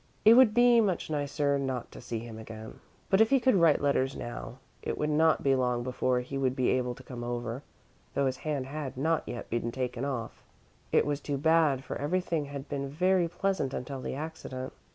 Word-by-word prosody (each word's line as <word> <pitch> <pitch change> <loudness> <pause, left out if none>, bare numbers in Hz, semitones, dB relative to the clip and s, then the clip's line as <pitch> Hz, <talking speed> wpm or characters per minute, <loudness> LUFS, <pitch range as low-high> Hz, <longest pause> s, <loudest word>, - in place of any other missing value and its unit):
It 220 - +10
would 235 -3 +6
be 240 -1 +6
much 185 -6 -1
nicer 145 -1 0
not 130 -3 -3
to - - -10
see 120 -1 -4
him 110 0 -7
again. 110 0 -9 0.3
But, 195 +2 +5
if 220 - +5
he 275 - +4
could 255 +1 +3
write 170 -6 +4
letters 135 -1 +1
now, 120 0 -6 0.2
it - - -3
would 150 0 0
not 160 +1 +3
be 135 - +4
long 125 -2 +1
before 125 0 0
he 135 +2 -5
would 130 -1 +1
be 130 -2 +1
able 125 -1 0
to 135 - -13
come 125 -2 -7
over, 120 +1 -3 0.5
though 140 - +2
his 130 -1 0
hand 145 -3 -2
had 140 -1 -5
not 160 +3 +1
yet 120 - -6
been 115 0 -1
taken 125 0 -3
off. 130 -5 -4 0.5
It - - +4
was 145 0 -1
too 145 -1 -2
bad, 155 -3 +3
for - - -5
everything 165 0 -1
had 140 0 -7
been 140 -1 -3
very 180 +4 +2
pleasant 175 -5 -1
until 130 +1 -5
the - - -4
accident. 135 -4 -6
140 Hz, 210 wpm, -29 LUFS, 125-160 Hz, 0.5 s, It